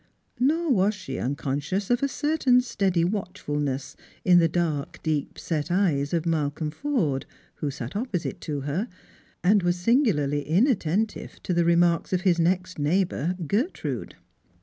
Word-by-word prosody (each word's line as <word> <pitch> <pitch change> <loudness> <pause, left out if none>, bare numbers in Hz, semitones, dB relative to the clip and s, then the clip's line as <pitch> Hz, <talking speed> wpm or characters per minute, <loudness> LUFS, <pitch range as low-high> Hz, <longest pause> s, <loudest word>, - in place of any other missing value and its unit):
Nor 310 +5 +2
was 205 -2 +3
she 185 -9 -6
unconscious 145 - -2
of 245 - +2
a 280 - +2
certain 280 -3 +2
steady 195 -8 0
watchfulness 145 -8 -2 0.3
in 180 -1 +7
the 165 - +4
dark 160 -3 -2
deep 155 -3 -1
set 155 -1 -2
eyes 165 -7 +1
of 170 -1 0
Malcolm 150 -1 -1
Forde, 165 - -1 0.3
who 150 - -2
sat 130 0 -6
opposite 205 -6 -3
to 145 -3 -3
her, 150 - -2 0.6
and 200 +3 +5
was 175 0 +1
singularly 175 - +2
inattentive 200 - 0
to 180 - -1
the 170 -1 +2
remarks 170 +1 +3
of 180 - +2
his 180 -3 +2
next 185 +1 0
neighbour, 175 +2 +1
Gertrude. 235 - -2
175 Hz, 145 wpm, -26 LUFS, 150-205 Hz, 0.6 s, in